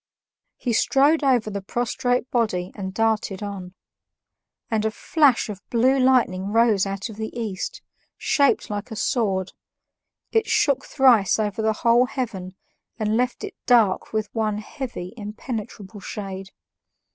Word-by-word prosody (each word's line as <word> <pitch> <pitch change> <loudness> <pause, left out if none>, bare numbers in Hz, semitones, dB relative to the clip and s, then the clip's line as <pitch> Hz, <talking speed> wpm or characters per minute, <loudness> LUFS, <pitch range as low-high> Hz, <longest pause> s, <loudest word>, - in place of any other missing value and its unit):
He 245 - -2
strode 285 +7 +3
over 245 -6 +2
the 200 0 -4
prostrate 245 +4 -1
body 200 -7 0
and 190 -2 -5
darted 215 -1 0
on. 190 -3 -7 1.0
And 220 -1 +1
a 220 - +2
flash 270 +4 +2
of 205 -2 -7
blue 255 +3 +3
lightning 235 -7 +2
rose 220 -3 +3
out 195 +2 -4
of 215 - -10
the 220 0 -3
East, 205 -5 -4 0.3
shaped 280 -1 +2
like 205 +2 -4
a 220 - -6
sword; 195 -5 0 0.8
it 450 -1 +2
shook 295 - +2
thrice 245 -8 +4
over 210 0 -1
the 220 0 +2
whole 240 +2 +5
heaven 195 -9 -5 0.4
and 215 -1 0
left 250 +1 0
it - - -5
dark 225 -6 +3
with 215 -1 -2
one 215 -2 0
heavy, 215 -4 -6
impenetrable 210 -1 -6
shade. 195 -1 -6
220 Hz, 140 wpm, -23 LUFS, 200-245 Hz, 1.0 s, whole